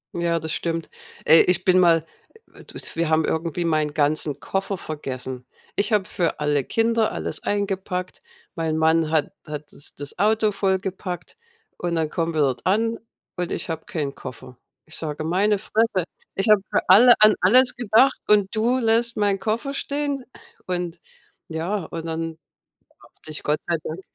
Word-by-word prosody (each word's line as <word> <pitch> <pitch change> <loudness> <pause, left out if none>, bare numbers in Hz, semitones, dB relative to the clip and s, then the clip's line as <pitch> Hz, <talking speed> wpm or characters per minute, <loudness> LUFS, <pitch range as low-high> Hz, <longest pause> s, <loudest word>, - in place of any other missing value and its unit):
Ja, 170 -1 0
das 160 0 -5
stimmt. 165 -1 -3 0.4
Äh, 160 - +8
ich 180 0 +1
bin 185 -1 +5
mal 165 -3 +4 0.5
äh, - - -17
w - - -12
du - - -13
s - - -6
wir 165 -1 0
haben 160 0 +3
irgendwie 165 +1 -2
meinen 155 -2 0
ganzen 150 -1 0
Koffer 195 0 -3
vergessen. 130 -5 -6 0.3
Ich 205 +3 +1
habe 210 -3 +2
für 170 -3 -2
alle 150 -2 +1
Kinder 225 - +1
alles - - -4
eingepackt. 195 -3 -3 0.3
Mein 160 -3 -2
Mann 160 0 +3
hat 155 -2 +1
hat 150 0 -8
das 145 - -10
das 145 +4 -7
Auto 215 +1 +3
vollgepackt 190 -2 -3 0.4
und 175 -1 -2
dann 160 -2 -1
kommen 165 -1 -2
wir 155 - +2
dort 135 -3 0
an 225 +4 +1 0.4
und 180 -1 -3
ich - - -4
habe 160 -1 -4
keinen 145 -4 -3
Koffer. 125 -1 -10 0.3
Ich 160 - -7
sage: 155 -1 -4
„Meine 195 +6 +2
Fresse, 215 -2 0 0.3
ich 195 - 0
habe 210 -2 +6
für - - 0
alle 235 +6 +9
an 215 0 +8
alles 250 +7 +5
gedacht 240 +3 +3
und 205 -1 +3
du 235 +4 +2
lässt 235 0 +2
meinen 205 -2 +1
Koffer 225 +7 -2
stehen?“ 285 -1 -2 0.4
Und 175 -2 -3 0.5
ja, 170 +4 -3
und 165 -1 -7
dann 165 0 -4 0.7
dachte - - -13
ich: 150 - -7
„Gott 150 +1 +1
sei 170 - +1
Dank.“ 160 +4 -5
175 Hz, 175 wpm, -23 LUFS, 160-210 Hz, 0.7 s, alle